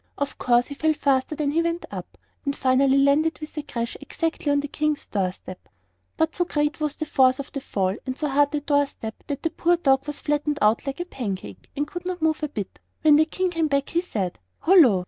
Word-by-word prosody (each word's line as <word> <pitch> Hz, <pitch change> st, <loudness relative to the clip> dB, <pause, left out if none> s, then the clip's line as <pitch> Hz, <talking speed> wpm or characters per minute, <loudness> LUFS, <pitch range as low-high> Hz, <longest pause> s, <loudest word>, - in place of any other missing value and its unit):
Of 285 Hz, -1 st, -3 dB
course 245 Hz, 0 st, +3 dB
he 285 Hz, -, -7 dB
fell 310 Hz, +2 st, +1 dB
faster 275 Hz, +1 st, +1 dB
than 290 Hz, -1 st, 0 dB
he 325 Hz, +3 st, +2 dB
went 335 Hz, +1 st, -2 dB
up, -, -, -8 dB, 0.3 s
and 280 Hz, -1 st, -1 dB
finally 265 Hz, +1 st, +3 dB
landed 285 Hz, +4 st, +3 dB
with 305 Hz, -1 st, -9 dB
a 300 Hz, -, -2 dB
crash 235 Hz, -4 st, -4 dB
exactly 315 Hz, 0 st, -2 dB
on 285 Hz, 0 st, +3 dB
the 290 Hz, -, -4 dB
King's 305 Hz, 0 st, -1 dB
door 190 Hz, -3 st, -1 dB
step. 185 Hz, 0 st, -12 dB, 0.5 s
But 320 Hz, 0 st, +1 dB
so 355 Hz, -, +1 dB
great 295 Hz, -3 st, -1 dB
was 300 Hz, -1 st, -1 dB
the 310 Hz, -, -3 dB
force 260 Hz, -3 st, +4 dB
of 280 Hz, -, -7 dB
the 275 Hz, -, -4 dB
fall 190 Hz, -6 st, -1 dB
and 260 Hz, +1 st, -3 dB
so 300 Hz, -, -1 dB
hard 285 Hz, +1 st, +3 dB
the 295 Hz, 0 st, -2 dB
door 285 Hz, -1 st, +2 dB
step 220 Hz, -4 st, -8 dB
that 285 Hz, -1 st, -4 dB
the 330 Hz, -, 0 dB
poor 345 Hz, +1 st, +2 dB
dog 270 Hz, -3 st, +2 dB
was 295 Hz, -, -4 dB
flattened 295 Hz, 0 st, 0 dB
out 220 Hz, +4 st, +2 dB
like 275 Hz, +3 st, -3 dB
a -, -, -3 dB
pancake, 195 Hz, -, -6 dB
and 290 Hz, -, +1 dB
could 350 Hz, +3 st, -7 dB
not 365 Hz, -1 st, -3 dB
move 315 Hz, -1 st, +1 dB
a 300 Hz, -, -1 dB
bit. 205 Hz, -8 st, -6 dB, 0.2 s
When 305 Hz, -2 st, +7 dB
the 315 Hz, -, +5 dB
King 370 Hz, +3 st, -1 dB
came 330 Hz, -2 st, +1 dB
back 280 Hz, -1 st, 0 dB
he 340 Hz, -, +1 dB
said: 200 Hz, -, -3 dB, 0.2 s
"Hullo! 320 Hz, -, +6 dB
290 Hz, 240 wpm, -24 LUFS, 260-315 Hz, 0.5 s, When